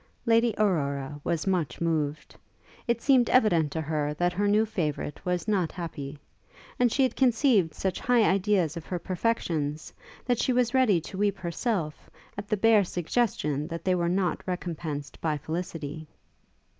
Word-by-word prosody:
Lady 230 -1 +3
Aurora 145 -8 0
was 170 -2 -1
much 175 -9 -1
moved. 155 -3 -2 0.5
It 235 -1 0
seemed 260 -4 +4
evident 175 - +3
to 160 - -2
her 150 -1 -2
that 175 +2 +1
her 205 +3 0
new 210 +2 +4
favourite 155 -7 -3
was 180 +2 -2
not 190 -6 +1
happy; 150 -5 -6 0.6
and 245 -2 +3
she 270 - +2
had 255 -2 +1
conceived 230 - +3
such 190 -1 -2
high 245 -2 +3
ideas 190 -5 +2
of 170 - -7
her 180 - -2
perfections, 165 -6 -2 0.3
that 245 -2 +1
she 255 - +1
was 245 0 +1
ready 250 -9 +4
to 190 +4 -8
weep 200 -1 +1
herself, 175 -3 -3 0.3
at 205 0 -6
the 210 - 0
bare 220 0 +5
suggestion 170 - -1
that 165 0 -6
they 185 - +3
were 170 -1 +1
not 180 -1 0
recompensed 165 -5 -5
by 155 -2 0
felicity. 155 -1 -5
180 Hz, 160 wpm, -27 LUFS, 155-215 Hz, 0.6 s, bare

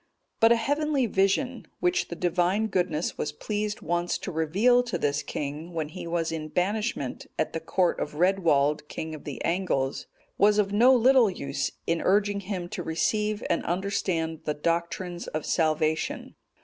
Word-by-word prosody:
But 225 +1 +6
a - - +7
heavenly 290 +3 +1
vision, 220 +6 0
which 360 +1 +1
the 170 - -6
Divine 180 +4 +1
Goodness 175 -4 -1
was 150 - -1
pleased 210 +6 -3
once 175 +1 -1
to 190 - -6
reveal 195 +10 +3
to 245 -1 -3
this 145 0 0
king, 150 +4 -5
when 160 -2 -2
he 175 +1 -7
was 165 -1 -1
in 155 -1 -4
banishment 195 - -2
at - - -1
the 165 - -2
court 175 +2 +1
of 150 - -4
Redwald, 150 -5 +2
king 160 +1 -5
of 155 - -9
the 145 - -6
Angles,(226) 165 -7 -1 0.3
was 205 +1 +5
of 205 -1 +1
no 240 +5 +6
little 250 -1 +5
use 140 -6 -3
in 165 0 0
urging 205 +1 +2
him 185 -3 -4
to 210 -2 -4
receive 210 +6 0
and - - 0
understand 175 -3 -1
the 150 - -1
doctrines 170 +2 -2
of 155 -1 -4
salvation. 155 -1 0
175 Hz, 165 wpm, -27 LUFS, 160-210 Hz, 0.3 s, a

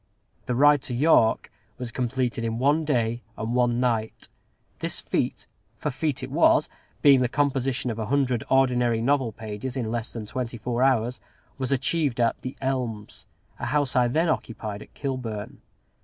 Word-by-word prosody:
The 125 - 0
Ride 145 +2 +5
to 125 - -2
York 125 -5 +3 0.3
was 125 -2 -5
completed 125 -1 -1
in 115 0 -2
one 145 +5 +2
day 120 -5 0 0.2
and 115 +1 -3
one 120 -1 +2
night. 115 -3 -1 0.5
This - - 0
feat - - -2 0.3
for - - -2
a - - -3
feat 145 +1 -2
it - - -6
was, - - +4 0.3
being 140 -2 +7
the 125 - +3
composition 135 -2 0
of 115 - -5
a 110 - -3
hundred 130 -2 +1
ordinary 125 -3 +3
novel 130 0 +1
pages 110 +4 -6
in 115 -4 -2
less 120 -1 -3
than 115 -2 -6
twenty 120 +2 -4
four 120 +2 -2
hours 125 -3 +2 0.4
was 130 -1 -2
achieved 135 0 +1
at 115 -1 +1
"The 130 - -6
Elms," 125 -6 -3 0.3
a - - -3
house 145 +1 0
I 125 -1 +4
then 160 +8 +1
occupied 110 -8 -3
at - - -13
Kilburn. 125 -7 -5
125 Hz, 170 wpm, -25 LUFS, 115-135 Hz, 0.5 s, being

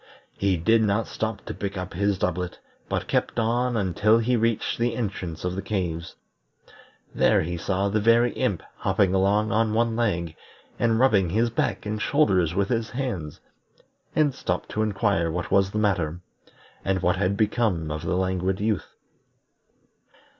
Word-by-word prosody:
He 95 -2 +1
did 110 +8 +3
not 105 +1 +1
stop 110 -2 -4
to - - -5
pick 100 -1 -4
up 90 0 -5
his 100 +2 +1
doublet, 90 -1 -2 0.3
but - - -1
kept - - 0
on 120 +1 +1
until 105 +3 +3
he 120 +2 +1
reached 115 -1 0
the 120 0 +1
entrance 90 -8 -4
of 90 0 -1
the 95 - -3
caves. 85 -6 -3 1.0
There - - +3
he 85 +2 -3
saw 95 +4 -1
the 105 +2 +1
Very 115 +2 +4
Imp 105 -10 -1
hopping 95 -2 +1
along 100 +3 +2
on 110 -1 +1
one 115 0 +1
leg, 85 -9 -1 0.4
and 115 -1 +2
rubbing 105 -9 +4
his 115 +5 +1
back 115 - -1
and 105 0 -3
shoulders 95 - +2
with 100 0 +1
his 115 -2 -1
hands, 120 - -4 0.7
and 150 -3 +3
stopped 90 -7 -3
to 110 - -2
inquire 100 -5 +1
what 90 +2 -4
was 95 -1 +4
the 105 - -4
matter, 90 -6 0 0.6
and 95 -1 0
what 90 0 +2
had 100 +1 0
become 105 -7 0
of 80 0 -4
the 90 +2 -1
Languid 95 0 0
Youth. 105 -1 -2
100 Hz, 165 wpm, -25 LUFS, 90-115 Hz, 1.0 s, Very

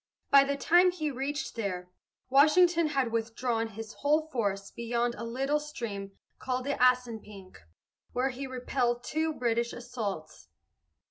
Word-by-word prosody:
By 275 0 +8
the 280 0 -1
time 350 +5 +5
he 315 -4 -2
reached 270 +2 -3
there, 180 -5 -4 0.4
Washington 330 +5 +5
had 270 -5 0
withdrawn 230 0 -1
his 220 0 -8
whole 305 +2 +1
force 200 -7 -2
beyond 235 +1 -1
a 235 - -7
little 270 +6 0
stream 220 -10 -6 0.3
called 255 0 -2
the 285 - 0
Assunpink, 225 -7 0 0.5
where 255 +2 0
he 270 +2 -5
repelled 250 -1 -1
two 315 +3 -1
British 235 -4 0
assaults. 215 - -6
250 Hz, 135 wpm, -29 LUFS, 225-280 Hz, 0.5 s, By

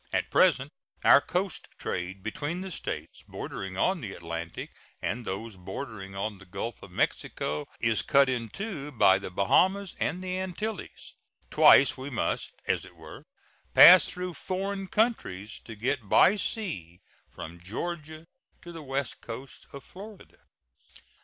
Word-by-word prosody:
At - - -1
present - - +4 0.3
our - - +8
coast - - -2
trade 95 +2 -4
between 145 +10 -3
the 190 0 -6
States - - -6
bordering 95 -1 -6
on 185 - +1
the 100 -6 -6
Atlantic 85 0 -6 0.3
and 115 +8 -3
those 100 +2 -5
bordering 95 +1 -7
on 100 0 -3
the 95 - -14
Gulf 100 +5 -5
of - - -11
Mexico 75 0 -2
is 115 -2 +2
cut 140 0 +4
into 140 - -4
by 95 -7 +5
the 100 - -6
Bahamas 185 - +2
and 180 +1 -1
the 185 0 -2
Antilles, 190 +3 -5 0.4
Twice 140 - +7
we 135 +2 -5
must, 125 - -2 0.2
as - - +1
it - - -14
were, - - -12 0.5
pass 180 +1 +10
through 180 0 -5
foreign 195 +2 -3
countries 145 - -1
to 115 - -8
get 120 0 -2
by 200 - +6
sea 160 - -4 0.3
from 85 +1 -9
Georgia 155 - -5 0.4
to 175 - -9
the 165 -1 -8
west 135 -2 -3
coast 125 +3 -9
of 140 - -9
Florida. 205 +1 -12
135 Hz, 145 wpm, -28 LUFS, -, 0.5 s, pass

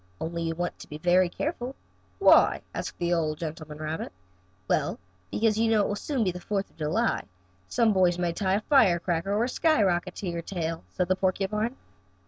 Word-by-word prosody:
Only 170 +1 -3
you 165 0 -2
want 175 +1 -3
to - - -10
be 150 - -7
very 180 +2 +3
careful." 265 - -4 0.4
"Why?" 390 - +5
asked - - -5
the 175 0 0
old 155 -3 0
gentleman 155 -2 -6
rabbit. 155 +1 -4 0.6
"Well, - - +1 0.3
because 220 - +1
you 225 0 +3
know 220 -2 +4
it - - 0
will 205 - -1
soon 255 +4 -1
be 185 - +1
the 180 - -7
Fourth 200 +1 -2
of - - -29
July, 165 +10 +1
and - - -14 0.4
some 225 - +2
boys 180 -2 +3
may 175 -1 0
tie 190 +1 +1
a 205 - 0
firecracker 185 - +3
or 210 +3 +2
a - - +1
skyrocket 210 - +2
to 195 - -5
your 170 -1 -2
tail," 165 - -4
said 180 - -1
the 185 - +2
porcupine. 200 +5 -1
185 Hz, 200 wpm, -27 LUFS, 170-215 Hz, 0.6 s, Why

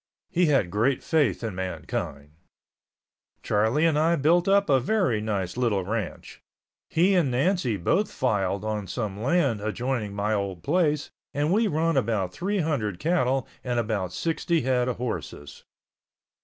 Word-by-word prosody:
He 180 -2 +3
had 135 -12 +2
great 120 +7 +1
faith 140 - +1
in 110 -3 -3
mankind. 90 -6 -5 1.1
Charlie 110 +10 +2
and 155 -2 +3
I 165 +2 +3
built 170 +5 +3
up 200 +1 +4
a 135 -3 +4
very 135 - +1
nice 100 -3 -2
little 115 -6 +1
ranch. 110 0 -5 0.5
He 180 +5 +3
and 175 -7 +3
Nancy 130 - +1
both 190 - +1
filed 100 -5 -1
on 105 -2 -3
some 105 0 -4
land 140 - +1
adjoining 110 -1 -2
my 105 +2 0
old 100 -5 -3
place 150 - +1 0.2
and 150 +4 +1
we 220 +2 +3
run 165 -1 +1
about 100 -5 0
three 195 +2 -1
hundred 120 - -1
cattle 135 - +1 0.2
and 125 -1 -2
about 105 -5 -1
sixty 165 - 0
head 125 -1 +1
of 125 - -2
horses. 90 - -6
125 Hz, 150 wpm, -26 LUFS, 105-160 Hz, 1.1 s, up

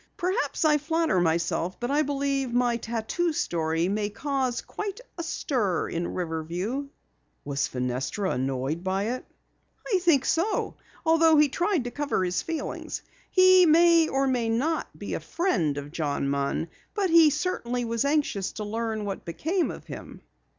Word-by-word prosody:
Perhaps 370 -2 0
I 300 -1 +4
flatter 320 - +1
myself, 170 +1 0
but 240 +2 -2
I 295 +2 +3
believe 275 -2 -1
my 245 -1 +2
tattoo 235 +10 -1
story 165 - 0
may 205 +1 -1
cause 260 +1 -1
quite 415 +1 -5 0.2
a 340 - -4
stir 240 - -1
in 170 +1 -3
Riverview." 180 - -3 0.6
"Was 140 0 -1
Fenestra 130 +10 -2
annoyed 135 +5 -2
by 190 +1 0
it?" 255 +1 -3 0.7
"I 380 - +4
think 325 -7 +3
so, 345 +7 0
Lou, - - -33 0.3
although 325 -1 +5
he 295 -1 +5
tried 350 +1 0
to 245 - -5
cover 285 -9 -1
his 180 0 0
feelings. 325 -3 -4 0.3
He 370 -1 +6
may 335 0 +6
or 270 -1 +1
may 245 -4 +1
not 285 +9 0
be - - -5
a - - -1
friend 175 - 0
of 145 0 -6
John 145 -4 -1
Munn, 140 +4 -1 0.3
but 390 -4 +1
he 330 -2 +8
certainly 265 -6 -2
was 230 0 0
anxious 280 -9 0
to 215 - -5
learn 220 0 -3
what 195 -1 -4
became 325 - -1
of - - -8
him." - - -9
245 Hz, 160 wpm, -26 LUFS, -, 0.7 s, he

